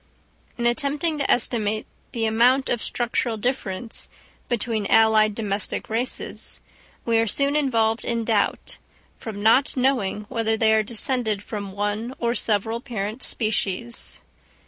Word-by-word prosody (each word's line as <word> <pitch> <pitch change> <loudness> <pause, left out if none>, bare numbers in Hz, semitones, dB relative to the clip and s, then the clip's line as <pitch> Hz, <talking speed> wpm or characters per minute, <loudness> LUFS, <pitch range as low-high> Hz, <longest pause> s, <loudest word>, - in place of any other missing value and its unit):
In 240 - -2
attempting 290 +5 0
to 280 - -1
estimate 215 -3 +1 0.3
the 230 -3 -1
amount 245 +5 +3
of 240 - 0
structural 240 -1 -1
difference 225 -2 -4 0.4
between 225 -3 -1
allied 220 -1 +5
domestic 205 -1 -2
races, 235 +3 -2 0.5
we 230 -1 +3
are 225 - +2
soon 280 +7 +1
involved 230 -6 +1
in 230 -1 -1
doubt, 215 -3 0 0.4
from 210 -3 -6
not 255 +5 +4
knowing 250 -6 +1
whether 225 -1 0
they 220 -1 +4
are 220 - +4
descended 220 -1 +1
from 200 -3 -6
one 210 +5 -2
or 235 0 0
several 225 0 +1
parent 225 -2 -4
species. 220 0 -2
225 Hz, 130 wpm, -23 LUFS, 215-245 Hz, 0.5 s, allied